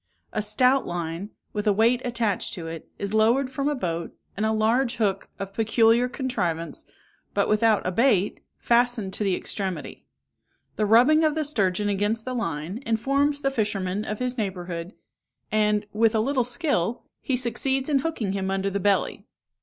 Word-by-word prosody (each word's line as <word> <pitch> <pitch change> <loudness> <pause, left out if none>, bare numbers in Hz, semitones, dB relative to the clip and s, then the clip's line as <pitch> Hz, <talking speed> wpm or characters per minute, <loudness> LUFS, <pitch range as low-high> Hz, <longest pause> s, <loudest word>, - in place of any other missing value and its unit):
A - - 0
stout 250 +6 +3
line, 175 +3 -4 0.2
with 210 0 -2
a - - +6
weight 230 +4 +3
attached 235 -6 -1
to 170 -4 -7
it, 165 -1 -7
is 200 +1 -4
lowered 235 +5 +3
from 275 +2 -1
a 295 - 0
boat, 170 -8 -3 0.2
and 215 +2 0
a - - +1
large 230 +3 +2
hook, 195 -4 -1
of 195 0 -6
peculiar 225 +2 +3
contrivance, 180 - -3 0.5
but - - +2
without 215 0 +3
a 185 - 0
bait, 210 -2 +2 0.2
fastened 235 -5 +1
to - - -2
the 195 -3 +1
extremity. 190 -1 -5 0.7
The 215 - 0
rubbing 255 +9 +6
of 310 -1 +2
the 310 -1 0
sturgeon 205 -7 0
against 205 +3 0
the 255 - -3
line 175 - -3
informs 275 +6 +1
the 275 - +1
fisherman 205 -5 -1
of 215 -1 -4
his 250 +1 -2
neighbourhood, 180 -3 -4 0.6
and, 210 -1 +2
with 225 +1 +3
a - - +3
little 255 +3 +1
skill, 240 - -1 0.2
he 260 - 0
succeeds 265 +2 0
in 290 -3 +2
hooking 260 -9 -2
him 190 -1 -2
under 195 0 -1
the 200 - -1
belly. 200 0 0
220 Hz, 170 wpm, -25 LUFS, 195-250 Hz, 0.7 s, a